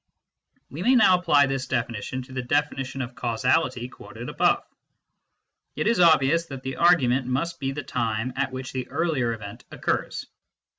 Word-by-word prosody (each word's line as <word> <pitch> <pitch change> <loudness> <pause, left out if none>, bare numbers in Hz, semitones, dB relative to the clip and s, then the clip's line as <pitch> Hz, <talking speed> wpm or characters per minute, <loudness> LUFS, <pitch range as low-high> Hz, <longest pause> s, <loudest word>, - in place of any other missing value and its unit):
We 150 - -6
may 250 +7 +4
now 215 -6 +6
apply 150 -5 +4
this 135 -1 -3
definition 120 +2 -3
to 130 +1 -13
the 130 - -2
definition 135 -1 -1
of 125 0 -8
causality 120 +1 0
quoted - - -10
above. - - +2 1.1
It 155 - -2
is 230 -3 +2
obvious 165 -1 +4
that 135 -3 -8
the 130 0 -5
argument 135 -7 +3
must 145 +7 -2
be 135 -2 -2
the 145 +1 -5
time 115 0 -2
at 135 0 -1
which 130 0 -6
the 130 -1 -4
earlier 155 -8 0
event 105 -3 -8
occurs. - - -2
130 Hz, 160 wpm, -25 LUFS, 125-155 Hz, 1.1 s, now